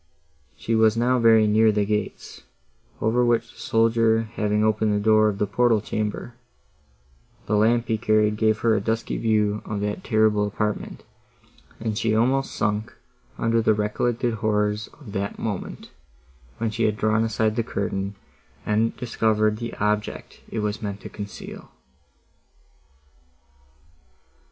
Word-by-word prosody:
She 115 - -3
was 110 0 +4
now 125 +2 +2
very 115 -2 +5
near 110 +1 +4
the 105 -1 0
gates, 105 -1 -4 0.6
over 115 +3 +2
which 120 -1 +1
the - - -18
soldier 115 0 +2
having 105 -1 0
opened 110 -1 +2
the - - +1
door 110 0 +4
of 100 - -4
the 105 - +1
portal 115 +2 +2
chamber, 110 +3 -4 1.1
the 105 - 0
lamp 115 +2 +3
he 110 -1 0
carried 105 -1 +2
gave 110 0 +2
her 115 -1 +3
a 100 - 0
dusky 115 +2 -2
view 105 -2 +1
of 105 -1 -4
that 105 0 -3
terrible 110 -1 +2
apartment, 105 +1 -3 0.8
and 110 -1 -2
she 110 -1 +1
almost 130 +4 +1
sunk 110 +2 -1 0.4
under 115 0 +1
the 110 -1 +3
recollected 115 +3 -1
horrors 105 -1 0
of 130 -9 -11
the 100 0 -2
moment, 105 -5 -5 0.7
when 115 -1 -1
she 115 +2 0
had 105 0 0
drawn 110 +1 +2
aside 110 -1 0
the 115 - +1
curtain, 100 -3 -3 0.5
and 110 +2 +1
discovered 110 -3 +1
the 115 0 -6
object 105 +1 -2
it 110 - -3
was 105 +1 -2
meant 100 -2 -4
to - - -8
conceal. 100 -1 -9
110 Hz, 145 wpm, -24 LUFS, 105-115 Hz, 1.1 s, very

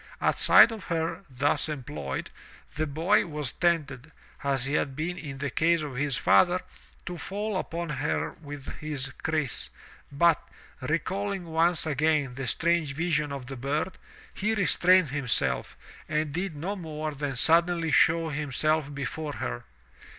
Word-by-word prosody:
At - - +1
sight - - +8
of 215 -6 -7
her, 165 +1 -2
thus 140 +4 0
employed, 75 - -5 0.4
the 155 +1 -1
boy 165 +8 +2
was 150 -5 -3
tempted, 155 -5 -1 0.3
as 135 -2 0
he 140 - -2
had 140 -2 0
been 165 +4 -2
in 145 -6 -7
the 140 -1 -3
case 165 +4 +2
of 145 -4 -6
his 135 -1 0
father, 175 - +4 0.5
to 175 -1 -5
fall 205 +1 -3
upon 170 -2 -3
her 145 0 -1
with 145 -4 -9
his 145 -3 -3
kriss, 155 -5 -1 0.4
but, 165 +4 +4 0.4
recalling 190 +7 -2
once 165 +1 +2
again 150 -2 +1
the 130 0 -5
strange 165 +1 +1
vision 155 -3 0
of 140 -2 -5
the 135 +1 -6
bird, 145 +8 -2 0.3
he 215 +3 0
restrained 185 -4 +4
himself, 125 - +1 0.3
and 150 -1 -1
did 175 0 -2
no 180 +8 -3
more 155 -4 -4
than 145 -1 -3
suddenly 165 +3 +3
show 165 +2 +4
himself 150 +1 0
before 145 +2 -4
her. - - -4
155 Hz, 150 wpm, -27 LUFS, 140-170 Hz, 0.5 s, sight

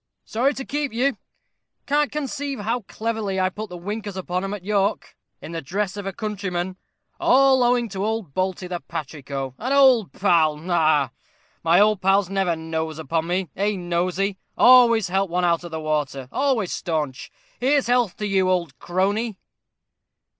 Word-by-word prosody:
Sorry 260 +6 +1
to 270 - -5
keep 290 -1 -2
you 255 +4 +1 0.7
can't 295 +1 +1
conceive 280 -3 -3
how 230 +4 -1
cleverly 220 -4 -2
I 185 0 +2
put 210 +2 -7
the 180 - -7
winkers 205 +2 -5
upon 180 0 -2
'em 195 - -3
at 190 -3 -11
York, 205 0 0 0.3
in - - -7
the 165 -1 -4
dress 195 +7 -2
of 200 -1 -5
a - - -1
countryman; 190 -3 -3 0.4
all 265 0 +5
owing 245 -1 +3
to 195 0 -4
old 215 -8 -2
Balty, 185 +1 -1
the 180 -1 -4
patrico, 140 -5 -6
an 255 +4 -3
old 260 -7 +5
pal 160 -6 +2
ha, 150 - -13
ha! 155 -6 +2 0.5
My 170 +2 +5
old 210 -1 +4
pals 195 0 +3
never 190 -3 +1
nose 160 -1 -4
upon 160 +1 -2
me 180 -2 -1
eh, 205 +2 0
Nosey 185 +2 -1 0.2
always 235 -5 +6
help 195 +1 0
one 180 +1 0
out 170 0 +1
of 175 - -7
the 160 -1 -4
water 150 -4 -2
always 260 -9 0
staunch. 155 -6 -3 0.3
Here's 275 +2 +2
health 245 -5 +1
to 210 - -3
you, 190 -2 +2
old 170 -8 -1
crony." 200 +4 -1
190 Hz, 170 wpm, -23 LUFS, 170-225 Hz, 0.7 s, always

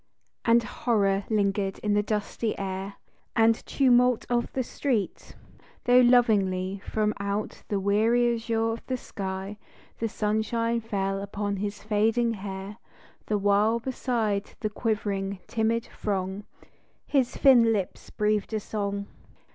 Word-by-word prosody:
And 235 0 +5
horror 200 -5 0
lingered 200 -2 0
in 210 -1 +1
the 205 - +3
dusty 210 +1 -2
air 195 0 -4 0.4
And 225 0 +3
tumult 250 -3 +3
of 240 0 +1
the 260 - 0
street, 235 -5 -2 0.5
though 245 0 +6
lovingly 200 -6 +3
From 215 -1 0
out 200 +1 -3
the 205 - -1
weary 225 +5 +3
azure 225 0 0
of 225 - -6
the 255 - -1
sky 195 -1 -6 0.4
The 225 - -1
sunshine 230 +2 0
fell 195 -3 -2
upon 200 0 -3
his 205 +1 -4
fading 225 +2 +2
hair, 195 0 -7 0.5
The 210 - +1
while 205 +3 +3
beside 230 -5 -2
the 215 - -1
quivering, 200 -3 -2
timid 230 0 0
throng 195 0 -3 0.6
His 265 -4 +1
thin 240 -4 +6
lips 200 -4 -3
breathed 210 0 0
a - - +1
song. 200 -1 -3
210 Hz, 130 wpm, -27 LUFS, 200-230 Hz, 0.6 s, though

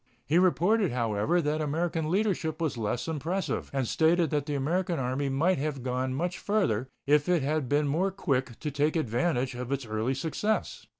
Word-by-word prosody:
He 165 +4 +3
reported, 185 +2 +3
however, 120 +8 +1
that 150 +1 0
American 160 +1 -1
leadership 185 -5 0
was 160 -5 -1
less 115 +4 -2
impressive, 165 +5 -2
and 135 -3 -1
stated 165 +2 +2
that 145 -1 0
the 145 - -1
American 170 +5 0
Army 135 +1 -1
might 160 +6 +2
have 140 -3 -3
gone 130 +1 -1
much 175 +5 -2
farther 160 - 0 0.2
if 145 +3 +3
it 175 -5 +3
had 145 -2 -1
been 145 +1 +2
more 170 +7 +1
quick 135 - -1
to 150 - -2
take 145 +3 +1
advantage 130 -1 0
of 125 +1 -5
its 140 -2 -1
early 110 +4 -1
success. 165 +10 -2
150 Hz, 180 wpm, -28 LUFS, 130-175 Hz, 0.2 s, He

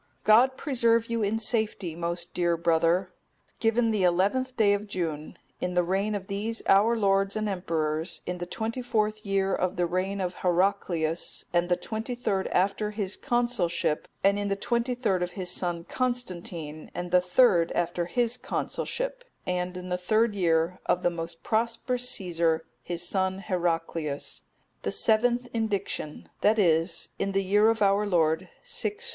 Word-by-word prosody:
God 250 +5 +5
preserve 235 -5 +2
you 230 -1 0
in 210 +2 +1
safety, 220 -6 -1
most 170 +1 -4
dear 170 -1 +1
brother! 170 +2 +2 0.5
Given 230 0 +2
the 210 -2 0
11th 200 +9 +2
day 205 -3 +5
of 205 +1 -2
June, 160 -6 -4 0.2
in 180 0 -2
the 180 - +4
reign 195 +4 0
of 195 -2 -4
these 210 +4 -2
our 210 +4 +4
lords 195 -1 +2
and 215 0 -1
emperors, 160 -4 -2
in 180 0 -4
the 175 - -4
twenty 225 +6 -3
fourth 215 -3 0
year 195 -2 0
of 185 0 0
the 175 - +1
reign 185 +3 -1
of 180 -1 -3
Heraclius, 175 -3 0
and 175 0 +2
the 175 - +4
twenty 220 +6 -4
third 200 -6 -1
after 200 +3 +1
his 205 -2 -2
consulship; 235 -11 0 0.2
and 200 +1 +4
in 205 - -1
the 200 - 0
twenty 235 +4 -1
third 205 -7 0
of 175 0 -2
his 180 -2 -1
son 175 -2 -1
Constantine, 175 -11 -4
and 175 0 -4
the 180 0 +5
third 180 -2 +4
after 175 0 -1
his 240 +3 0
consulship; - - -3 0.2
and 180 0 -2
in 180 0 -7
the 180 0 -1
third 215 +4 +2
year 170 -2 +1
of 180 - +1
the 175 - +3
most 165 0 -6
prosperous 235 +2 +1
Caesar, 170 -6 +1 0.2
his 175 +2 -4
son 190 -1 0
Heraclius,(262) 165 -6 -4
the - - -2
seventh 240 +2 +2
indiction; 200 -8 -3
that 215 +2 +4
is, 165 -3 +2
in 195 - -1
the 195 0 +1
year 205 +3 +4
of 225 -2 +1
our 200 +1 +3
Lord, 160 -4 +1
634." 475 -2 -2
195 Hz, 165 wpm, -27 LUFS, 175-220 Hz, 0.5 s, God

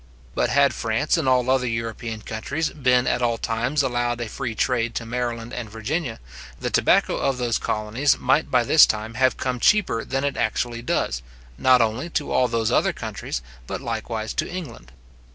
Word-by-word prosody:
But - - +1
had 140 0 +4
France 115 +7 0
and 155 -6 +1
all 125 -1 +3
other 130 -1 +2
European 115 -1 -4
countries 140 +8 -2
been 125 -3 +2
at 125 - 0
all 120 -1 +1
times 125 +7 0
allowed 120 -2 -1
a 120 - -3
free 120 0 -4
trade 120 0 0
to 120 - -3
Maryland 120 0 -3
and 120 -3 -5
Virginia, 115 +4 -3 0.4
the - - -3
tobacco - - +3
of 135 -2 0
those 120 -2 0
colonies 110 +7 0
might 155 - +1
by 125 -2 +3
this 155 +6 +7
time 110 +1 -3
have 130 +2 +2
come 125 -1 -2
cheaper 200 - +3
than 135 +1 -2
it 140 -1 -1
actually 120 +1 -1
does, 60 - -1 0.3
not 130 - +4
only 115 +9 -2
to 150 - -4
all 125 - +3
those 115 -2 0
other - - +2
countries, - - -5 0.2
but - - -4
likewise 115 -3 -4
to - - -2
England. 130 - -8
120 Hz, 185 wpm, -23 LUFS, 115-130 Hz, 0.4 s, this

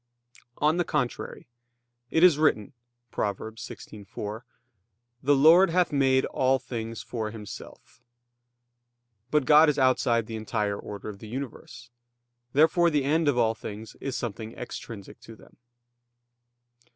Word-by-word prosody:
On 155 +3 +2
the 175 - +2
contrary, 125 -6 -3 0.6
It 160 - +2
is 170 -5 +6
written 130 -7 +1 0.4
(Prov. 100 -2 -1
16:4): 110 -1 -8 0.8
"The 145 +2 +3
Lord 165 +7 +7
hath 180 +1 +2
made 135 -2 +3
all 130 0 +1
things 115 -3 -6
for 110 -3 -4
Himself." 105 -2 -11 1.3
But 150 -1 +2
God 150 +2 +7
is 150 - 0
outside 125 -3 +2
the 110 0 -6
entire 105 -1 -2
order 100 0 -8
of 105 -2 -7
the 110 - -10
universe. 125 -1 -8 0.6
Therefore 160 +5 +4
the 150 -3 +1
end 155 +3 +1
of 140 -4 +2
all 115 -2 +3
things 110 -1 -9
is 135 -2 -3
something 110 -1 -5
extrinsic 115 -4 -9
to 115 - -13
them. - - -20
125 Hz, 130 wpm, -27 LUFS, 110-150 Hz, 1.3 s, Lord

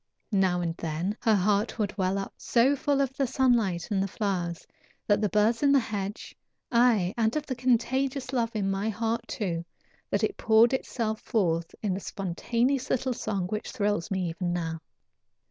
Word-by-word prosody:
Now 190 -3 +2
and 165 -1 -2
then 165 +5 -2
her 225 -3 +4
heart 205 +4 +1
would 210 -3 -1
well 190 -1 0
up 195 - -4
so 250 +4 +3
full 280 0 +1
of 270 -1 0
the 275 -2 0
sunlight 230 -10 +1
and 195 -2 +2
the 195 - 0
flowers, 185 -5 -2 0.4
and 205 0 +3
the 210 - +2
birds 215 +3 +2
in 285 -1 +4
the 280 - +6
hedge, 205 -3 -5 0.4
aye, 235 -6 +3
and 225 +1 +1
of 305 -1 -1
the 265 - -3
contagious 255 +2 0
love 230 -2 0
in 195 -2 0
my 195 +3 -1
heart, 230 +2 -2
too, 170 -6 -2 0.5
that 200 - 0
it 215 - 0
poured 225 +3 +5
itself 225 -4 -2
forth 170 -6 0
in 195 -3 0
a - - -3
spontaneous 235 +9 -1
little 260 0 0
song 195 -5 -2
which 215 +1 -3
thrills 205 -6 -1
me 190 -3 -1
even 175 +1 -2
now. 165 -2 -3
215 Hz, 180 wpm, -28 LUFS, 190-240 Hz, 0.5 s, the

